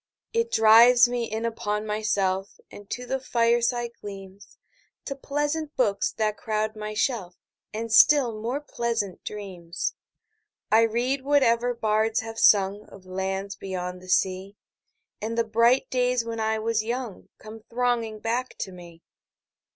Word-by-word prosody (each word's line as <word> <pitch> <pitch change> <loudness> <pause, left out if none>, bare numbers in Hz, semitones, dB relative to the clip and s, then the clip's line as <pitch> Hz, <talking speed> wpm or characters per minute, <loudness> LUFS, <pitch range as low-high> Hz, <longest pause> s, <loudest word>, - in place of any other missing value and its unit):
It 460 0 0
drives 235 - +7
me 240 -2 -3
in 220 +1 -2
upon 210 -2 -2
myself 200 -3 -1
5 - - -27
And 205 -1 -12
to 250 - -5
the 265 +2 -2
fireside 240 -1 +1
gleams, 195 -1 -11 0.5
To 275 - -4
pleasant 295 +2 -3
books 205 -6 +1
that 215 -1 -1
crowd 215 0 -2
my 215 0 -6
shelf, 210 -6 -1 0.4
And 225 +1 -4
still 265 -2 +6
more 235 +7 -3
pleasant 235 -8 -3
dreams. 185 -5 -5 0.8
I 220 +1 +6
read 245 +5 -1
whatever 245 -4 +2
bards 220 0 +1
have 225 0 -7
sung 200 +1 +4
Of 190 -1 -15
lands 190 +1 -3
beyond 180 -1 -5
the 185 - -13
sea, 190 +2 0 0.6
10 215 - -4
And - - -6
the 230 - +3
bright 230 +3 +3
days 250 -2 +1
when 230 -1 -5
I 220 0 0
was 220 0 0
young 235 -2 -5
Come 220 +1 -11
thronging 235 -3 -1
back 240 +3 -2
to 190 - -4
me. 170 -2 -13
220 Hz, 150 wpm, -25 LUFS, 200-240 Hz, 0.8 s, drives